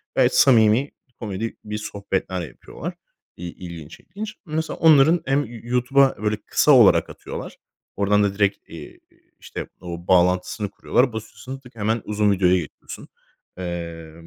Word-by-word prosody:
gayet - - +3
samimi 115 +1 +5 0.3
komedi 110 +1 -4
bir 105 0 -5
sohbetler 100 -3 -3
yapıyorlar, - - -8 0.4
iii, 85 0 -6
ilginç, 85 -4 -10
ilginç. 210 +5 -8
Mesela 160 0 -3
onların 160 +1 +5
hem 140 +2 +1 0.2
YouTube'a 125 +3 +2
böyle 105 0 +1
kısa - - +3
olarak - - +6
atıyorlar, - - -8 0.4
oradan 105 +1 +2
da 100 -1 0
direkt, 100 0 +1
eee, - - -11
eee, - - -29 0.2
işte, - - -7
o 85 -1 -8
bağlantısını 90 +3 +2
kuruyorlar. 125 +4 +1
Basıyorsun 125 +4 -8
tık 125 -3 -17
hemen 110 +1 -1
uzun 105 -1 +1
videoya 95 -2 +3
geçiyorsun, 80 -5 -8 0.5
eee, 85 -3 -6
105 Hz, 140 wpm, -22 LUFS, 90-125 Hz, 0.5 s, olarak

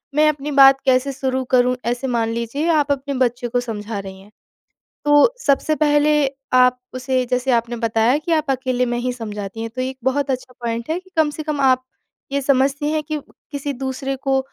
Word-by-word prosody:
मैं 305 +1 +5
अपनी 295 0 -3
बात 270 0 +8
कैसे 260 +1 +2
शुरू 260 -1 -2
करूँ, 250 0 +4
ऐसे 245 +3 -1
मान 230 -3 0
लीजिए 235 +8 -2
आप 295 -3 +2
अपने 280 0 -2
बच्चे 245 0 -1
को 245 +1 0
समझा 220 -3 -5
रही 190 -1 -9
हैं। 205 +2 -18 0.7
तो 290 +10 +5
सबसे 290 +2 +2
पहले 295 0 +4 0.4
आप 250 0 +4
उसे 255 0 -1
जैसे 250 +1 0
आपने 235 0 0
बताया 230 +3 +2
कि 330 +2 -5
आप 310 -3 +1
अकेले 255 -1 0
में 240 0 -2
ही 250 +1 -1
समझाती 210 -2 -6
हैं 230 - -4
तो 255 - -2
एक 260 +1 -4
बहुत 275 +2 0
अच्छा 255 0 -5
पॉइंट 230 +1 -3
है 330 +3 -1
कि 375 - -22
कम 315 -2 +3
से 310 +1 -6
कम 300 -1 -3
आप 255 -1 +3 0.5
ये 280 0 0
समझती 275 +2 +1
हैं 310 - 0
कि 305 0 -3 0.3
किसी 285 0 -3
दूसरे 265 +1 -4
को 270 0 0
260 Hz, 200 wpm, -20 LUFS, 245-285 Hz, 0.7 s, बात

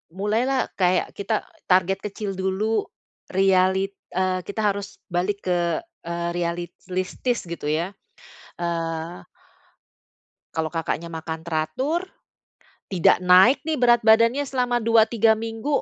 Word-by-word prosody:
mulai 210 +5 0
lah 270 -1 0
kayak 180 -1 +2
kita 215 +2 -1 0.2
target 190 +1 +3
kecil 205 0 -5
dulu, 205 +3 0 0.4
realit 190 0 +2 0.2
eee, 185 0 +1
kita 210 +2 -3
harus 200 0 -8
balik 190 +4 -1
ke 175 - 0 0.2
eee, 170 0 -2
realistis, 175 +6 -3
gitu 170 -3 -6
ya, 165 +5 0 0.7
eee 165 - -3 1.3
Kalau 160 -1 0
Kakaknya 165 0 -3
makan 160 0 -5
teratur, 175 - -1 0.8
tidak 185 -4 +3
naik 190 +11 +6
nih 310 -5 -1
berat 240 -2 +4
badannya 230 +5 +5
selama 250 -2 0
2, 230 -1 +4
3 225 -1 +4
minggu 225 +6 -2
190 Hz, 120 wpm, -24 LUFS, 175-225 Hz, 1.3 s, naik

